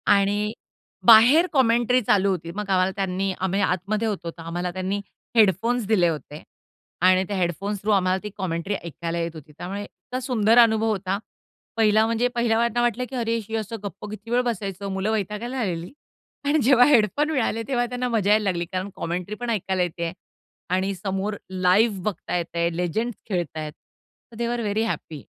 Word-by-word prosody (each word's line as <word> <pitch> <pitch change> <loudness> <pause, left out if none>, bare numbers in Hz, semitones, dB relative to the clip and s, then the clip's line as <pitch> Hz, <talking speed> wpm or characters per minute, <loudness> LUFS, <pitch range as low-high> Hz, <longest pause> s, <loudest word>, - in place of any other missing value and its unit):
आणि 205 +2 +1 0.5
बाहेर 245 +10 +8
कॉमेंट्री 245 -1 +3
चालू 200 -3 +3
होती. 170 -3 -2
मग 210 -1 -4
आम्हाला 185 0 +3
त्यांनी 195 0 -1
आम्ही 190 +2 0
आतमध्ये 200 +4 0
होतो. 180 -5 -3
तर 165 - -13
आम्हाला 175 +2 -3
त्यांनी 190 +2 -2 0.3
हेडफोन्स 225 +3 +3
दिले 190 -6 +4
होते 150 -1 -6 0.6
आणि 185 +1 +5
त्या 200 -2 -3
हेडफोन्स 190 +4 -1
थ्रू 215 - 0
आम्हाला 185 -2 +3
ती 210 - -4
कॉमेंट्री 185 +1 -2
ऐकायला 170 +1 -4
येत 165 0 -2
होती. 155 -1 -11
त्यामुळे 195 +3 -5
इतका 225 +7 -7
सुंदर 235 -3 +2
अनुभव 225 -1 +5
होता. 195 -1 -1 0.6
पहिला 220 0 +4
म्हणजे 230 +2 +1
पहिले 235 -1 +2
आम्हाला 235 0 +2
तर 240 - +2
वाटलं, 240 +1 0
की - - -7
"अरे, 230 -2 0
हे 225 - -2
असं 220 +1 -4
गप्प 200 0 -7
किती 215 +1 -9
वेळ 245 - +3
बसायचं?" 200 -3 -3
मुलं 195 +3 -1
वैतागायला 220 +5 -3
आलेली 175 -5 -3 0.5
आणि 295 +2 +3
जेव्हा 250 0 +6
हेडफोन 275 +3 +3
मिळाले, 230 -5 0
तेव्हा 245 -3 +1
त्यांना 250 +1 -3
मजा 215 -4 +1
यायला 215 0 +4
लागली 175 -4 -1
कारण 185 +2 -3
कॉमेंट्री 180 +5 -4
पण 245 +1 -5
ऐकायला 190 -4 0
येतय 170 -1 -3 0.6
आणि 190 +2 0
समोर 195 +2 -3
लाईव्ह 190 +3 +2
बघता 190 -3 -2
येतय. 170 0 -1
लेजेंड्स 200 +7 -2
खेळत 175 -5 -2
आहेत. 155 -1 -4
So 235 - -25
they 235 +1 -2
are 240 - -2
very 215 +1 0
happy. 160 - -4
205 Hz, 180 wpm, -24 LUFS, 185-230 Hz, 0.6 s, बाहेर